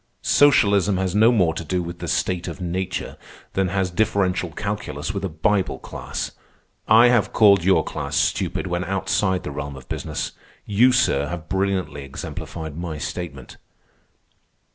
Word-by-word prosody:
Socialism 100 -9 +4
has 95 -1 -1
no 110 +3 +5
more 90 -9 +3
to - - -5
do 90 +3 -1
with 85 0 -7
the 85 - -5
state 90 +1 -1
of - - -6
nature 90 +1 -3 0.4
than 95 -1 +1
has 95 0 -1
differential 95 -3 +1
calculus 85 -4 -4
with 100 - -4
a 95 - -1
Bible 95 +5 0
class. - - -5 0.6
I 115 +3 +7
have 120 -4 +2
called 100 -5 +6
your 90 -3 +4
class - - -4
stupid - - 0
when 90 0 -2
outside 95 0 0
the - - -5
realm 70 0 -5
of 65 -1 -12
business. - - -3 0.3
You, 115 +5 +4
sir, 75 - +2
have 85 -1 -6
brilliantly 95 -6 -1
exemplified 75 +3 -7
my 85 -2 -5
statement." 75 -5 -6
90 Hz, 155 wpm, -22 LUFS, 85-100 Hz, 0.6 s, I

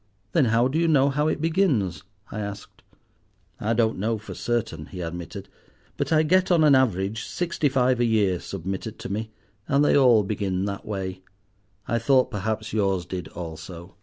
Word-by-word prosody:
"Then 155 -6 +3
how 115 +2 +3
do 145 +5 -1
you 170 - +2
know 140 -3 +4
how 150 +2 +1
it 155 - 0
begins?" 160 - +1 0.3
I 110 - -4
asked. 100 -1 -7 0.8
"I 110 +2 0
don't 115 -2 +1
know 110 +3 0
for 110 - -9
certain," 110 -10 -2
he 95 - -9
admitted, 85 -1 -6 0.5
"but - - -2
I 155 -1 +4
get, 185 +4 +3
on 170 -3 +4
an 150 -2 +6
average, 110 -4 +1
sixty 170 -4 -1
five 130 -2 +2
a 120 - +3
year 105 -6 +2
submitted 95 +4 -5
to - - -7
me, 110 +2 -3 0.4
and 145 0 +3
they - - +4
all 125 -6 +6
begin 95 -2 -2
that 100 -1 -5
way. 95 -2 -4 0.7
I 115 - +1
thought, 130 +2 +3
perhaps, 110 +1 -3
yours 95 -4 +1
did 90 -2 -5
also." 85 +1 -8
110 Hz, 180 wpm, -25 LUFS, 95-135 Hz, 0.8 s, an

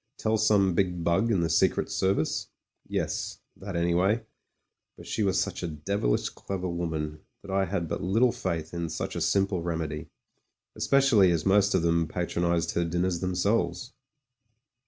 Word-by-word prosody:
Tell 110 0 +1
some 105 -3 +3
big 90 -2 0
bug 85 +8 +2
in 95 -5 +2
the 85 - 0
Secret 80 - +2
Service? 95 -4 0 0.4
Yes - - -2
— - - -29
^that 95 -2 -6
anyway; 90 +6 +2 0.7
but - - -12
she - - -2
was 95 -3 +2
such - - -2
a 90 - -2
devilish 75 -3 -1
clever 95 -2 -5
woman, 80 -3 -3 0.2
that 100 - -8
I 95 0 +2
had 90 -2 -2
but - - -3
little 115 +7 +3
faith 80 -5 -3
in 85 -1 -3
such 80 - -4
a - - -2
simple 95 -2 +1
remedy, 80 -3 -3 0.7
especially 135 -9 +4
as 85 -3 0
most 100 +1 +4
of 85 - +2
them 85 -1 +2
patronised 85 0 -1
her 85 - 0
dinners 85 +1 0
themselves. 95 +4 0
90 Hz, 160 wpm, -27 LUFS, 85-100 Hz, 0.7 s, especially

